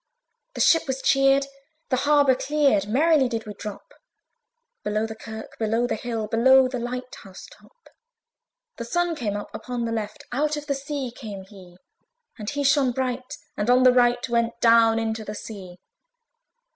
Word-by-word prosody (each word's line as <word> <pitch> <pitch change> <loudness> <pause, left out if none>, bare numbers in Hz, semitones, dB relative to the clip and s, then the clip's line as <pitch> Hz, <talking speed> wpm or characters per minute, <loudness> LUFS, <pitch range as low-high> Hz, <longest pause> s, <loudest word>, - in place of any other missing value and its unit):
The - - -2
ship 330 -1 +4
was 265 0 -2
cheered, 275 0 +3 0.4
the 255 - +1
harbour 290 -3 +5
cleared, 275 -7 +1
Merrily 285 +2 +3
did 230 -2 -4
we 210 - -7
drop 205 0 -9 0.9
Below 210 +1 -1
the 220 - -6
kirk, 220 0 -10
below 225 +2 +1
the - - -1
hill, 225 -1 -4
Below 260 +4 +5
the 255 -1 -4
light 250 +1 -5
house 190 -2 -12
top. - - -21 0.9
The 235 - -5
Sun 350 +7 0
came 210 -8 -3
up 205 - -8
upon 240 +1 -4
the 230 - -3
left, 215 -2 -4
Out 300 +4 0
of 295 - -6
the 285 - -1
sea 275 -2 -4
came 205 -5 -8
he! 190 -3 -15 0.6
And 210 0 -4
he 285 0 -2
shone 275 -2 +3
bright, 255 +2 -3 0.2
and 205 +3 -2
on 250 +1 +5
the 255 -1 +6
right 245 0 +2
Went 235 -1 -1
down 230 -1 +5
into 225 -1 -2
the 210 0 -7
sea. 190 -5 -9
245 Hz, 170 wpm, -24 LUFS, 220-270 Hz, 0.9 s, the